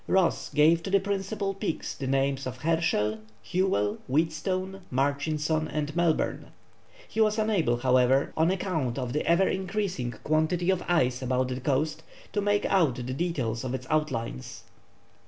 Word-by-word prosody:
Ross 185 -3 +2
gave 160 +3 +5
to 195 - -5
the 200 +1 +4
principal 200 +1 -2
peaks 195 -4 -3
the 135 - -5
names 135 0 0
of 130 0 -5
Herschell, 140 -9 +1 0.3
Whewell, 175 - 0
Wheatstone, 185 +6 -1
Murchison, 150 +4 0
and 150 0 -3
Melbourne. 170 -2 +1 0.6
He 220 - -1
was 215 0 +3
unable, 200 - +2
however, 130 +2 +3
on 160 +2 +3
account 165 -10 -1
of 125 -2 -3
the 150 - 0
ever 170 +3 +4
increasing 190 -8 -2
quantity 160 +4 +1
of 185 -2 0
ice 130 -8 +2
about 130 0 0
the 130 0 -3
coast, 150 +4 0 0.3
to 205 - +1
make 205 0 +1
out 165 -10 +3
the 125 - -5
details 130 -4 -2
of 130 0 -2
its 130 - -6
outlines. 120 - -2
155 Hz, 155 wpm, -27 LUFS, 130-185 Hz, 0.6 s, gave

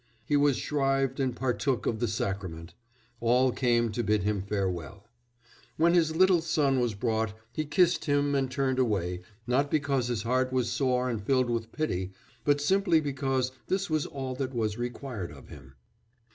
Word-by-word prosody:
He 145 - +1
was 145 -2 +3
shrived 135 -2 0
and 130 -3 0
partook 130 -1 -1
of 110 - -1
the 120 - 0
sacrament. 95 -5 -4 0.5
All 125 +2 +3
came 120 -2 +1
to 120 - -2
bid 105 -2 +1
him 105 -1 0
farewell. 95 -1 -3 0.7
"When 170 +2 +4
his 160 -2 +3
little 185 -1 +5
son 150 -5 +1
was 120 -4 0
brought, 110 -1 -1 0.2
he 155 - -2
kissed 175 +4 +2
him 145 -1 +2
and 135 -2 +1
turned 130 0 0
away, 90 -7 0 0.2
not 130 +4 +1
because 140 -5 +1
his 120 -3 -2
heart 130 +2 +1
was 125 -2 0
sore 125 -1 +1
and 115 -4 -2
filled 130 +1 +2
with 115 -1 -2
pity, 95 - -2 0.3
but 145 +1 +3
simply 175 +2 +3
because 135 -3 -1 0.2
this 195 -2 -1
was 155 -2 +1
all 135 -2 -5
that 130 -1 -3
was 110 -3 0
required 120 - -5
of 70 -3 -13
him." 70 -1 -13
130 Hz, 175 wpm, -28 LUFS, 110-145 Hz, 0.7 s, little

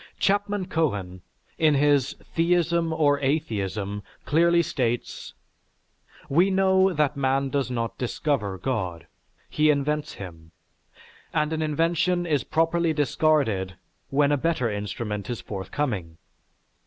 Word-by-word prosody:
Chapman 205 0 +1
Cohen, 100 - -2 0.4
in 155 -2 +4
his 140 -1 +3 0.2
"Theism 170 0 +2
or 145 -3 +2
Atheism," 105 -8 -2 0.2
clearly 170 +2 +4
states: 120 -6 -3 0.9
"We 175 +7 +3
know 190 0 +3
that 150 -3 +1
man 135 0 +1
does 140 -2 -1
not 115 -2 -3
discover 120 -6 -1
God, 95 -8 -3 0.4
he 155 0 +2
invents 150 +1 0
him, 80 -4 -10 0.8
and 150 +1 +1
an 160 - -1
invention 165 +3 +1
is 150 -5 +1
properly 165 +1 +1
discarded 140 - +1 0.3
when 140 +1 +3
a 145 - +3
better 130 -6 0
instrument 105 0 -4
is 120 - -3
forthcoming. 95 - -4
145 Hz, 115 wpm, -25 LUFS, 110-165 Hz, 0.9 s, in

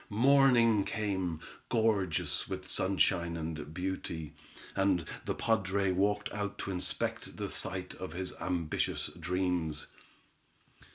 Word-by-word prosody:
Morning 120 -2 +5
came, 95 -7 -1 0.3
gorgeous 105 -7 +1
with - - -4
sunshine 90 -3 +2
and 80 -2 -4
beauty, 85 -3 -4 0.4
and 95 -4 +2 0.2
the - - -1
padre 100 -3 +1
walked 105 +3 +1
out 105 -1 -3
to 100 - -3
inspect 90 -1 -2
the - - -2
site - - -3
of - - -6
his 90 +1 -3
ambitious 85 -4 -1
dreams. 90 -3 0
95 Hz, 110 wpm, -32 LUFS, 85-105 Hz, 0.4 s, Morning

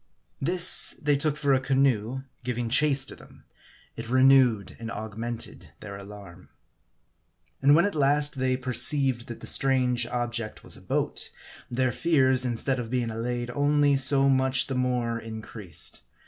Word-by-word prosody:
This 175 +5 +4
they 145 -1 +1
took 150 +1 0
for 145 -2 +1
a 130 - +3
canoe 130 -2 0 0.2
giving 120 -1 -3
chase 140 +1 +3
to - - -10
them. - - -18 0.5
It 115 0 -8
renewed 130 -6 +3
and 115 -1 -6
augmented 110 +2 -7
their 100 -2 -9
alarm. 100 -3 -12 1.1
And 140 +2 +5
when 170 - +4
at 205 - -2
last 145 -1 +1
they 130 0 0
perceived 130 -1 +1
that 120 - -9
the - - -9
strange 125 -3 +1
object 120 -2 -4
was - - -6
a - - -14
boat, - - -3 0.4
their 125 +1 0
fears, 130 -3 +2
instead 125 +2 -1
of 115 -2 -5
being 120 -2 -2
allayed, 120 +2 -4
only 145 +1 +2
so 135 0 +3
much 130 0 +2
the 135 - -5
more 125 -2 -1
increased. 110 -4 -7
130 Hz, 150 wpm, -26 LUFS, 115-135 Hz, 1.1 s, And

